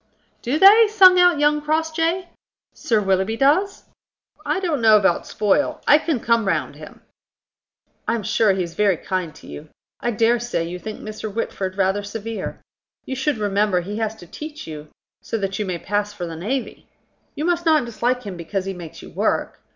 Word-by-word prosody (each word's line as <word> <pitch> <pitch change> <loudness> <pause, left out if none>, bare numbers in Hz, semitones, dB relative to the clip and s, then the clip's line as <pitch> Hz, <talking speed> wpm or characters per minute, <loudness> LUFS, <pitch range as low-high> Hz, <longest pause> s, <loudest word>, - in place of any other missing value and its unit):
"Do 260 +5 -1
they?" 420 +6 +8
sung 375 -4 +6
out 355 -3 +5
young 295 +1 +2
Crossjay. 325 +3 -1 0.5
"Sir 225 -3 0
Willoughby 195 +2 0
does?" 320 - +2 0.6
"I - - -1
don't 330 -8 -1
know 220 -1 +7
about 190 -4 +1
spoil. 215 +7 0
I 295 - +7
can 310 -5 -1
come 230 -2 +1
round - - -1
him." - - -13 1.1
"I - - +1
am 225 - -4
sure 215 0 +2
he 190 -1 -1
is 170 -1 -7
very 200 -3 +2
kind 180 -4 -4
to - - -15
you. 150 +1 -10 0.3
I 240 - -1
dare 230 +1 +2
say 240 -7 -2
you 180 +1 -6
think 215 +3 -7
Mr. 215 0 -6
Whitford 195 -3 -4
rather 195 +1 +1
severe. 220 +2 -6 0.4
You 265 - -4
should 265 0 -1
remember 205 -2 +1
he 205 +4 -6
has 220 -1 -2
to 200 - -13
teach 305 - -9
you, 150 -1 -9 0.3
so 225 - -3
that 195 -1 -3
you 210 - -2
may 180 -2 -2
pass 205 +3 -2
for 180 -4 -5
the 165 -1 -6
navy. 230 +11 -4 0.5
You 300 - -3
must 345 -1 0
not 310 -5 +4
dislike 240 +2 -1
him 200 -3 -6
because 185 +3 -4
he 195 - -3
makes 170 -3 -10
you - - -11
work. - - -1
220 Hz, 190 wpm, -21 LUFS, 195-295 Hz, 1.1 s, they